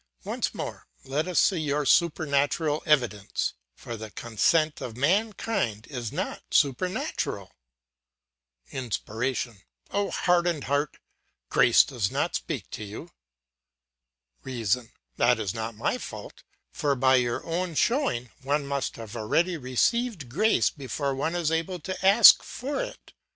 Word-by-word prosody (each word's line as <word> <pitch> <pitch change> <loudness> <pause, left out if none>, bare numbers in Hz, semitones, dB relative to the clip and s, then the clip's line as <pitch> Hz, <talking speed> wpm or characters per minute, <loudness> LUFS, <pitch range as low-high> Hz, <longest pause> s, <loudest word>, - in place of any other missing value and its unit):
Once - - -2
more, - - -6 0.2
let 145 +5 -2
us 180 - +2
see 185 -4 +3
your 150 -1 0
supernatural 150 -1 +2
evidence, 120 -9 +1 0.2
for 120 - -7
the 110 -1 -7
consent 150 +9 +1
of 115 -1 -6
mankind 180 - 0
is 120 -5 -4
not - - -3
supernatural. 145 +7 0 1.2
"INSPIRATION: 120 -2 -3 0.3
Oh, 200 0 0
hardened 175 -3 +1
heart, 145 +1 -1 0.5
grace 120 - +6
does 120 -8 -2
not - - -1
speak - - -3
to 110 - -6
you. 105 +1 -8 1.3
"REASON: 120 -2 -1 0.3
That 120 0 +3
is 105 -3 -2
not 110 0 -4
my 120 - -1
fault; - - -9 0.3
for 145 -3 0
by 130 0 +4
your 120 -1 -1
own 170 0 -2
showing, 230 - +1
one 140 +2 0
must 140 -1 -2
have 115 0 -9
already 165 +11 +1
received 160 - 0
grace 210 - +3
before 140 0 -3
one 150 +6 -2
is 170 -3 0
able 165 +3 -1
to 185 +3 -5
ask 200 +4 +9
for 280 - -4
it. - - -8
140 Hz, 130 wpm, -27 LUFS, 120-170 Hz, 1.3 s, ask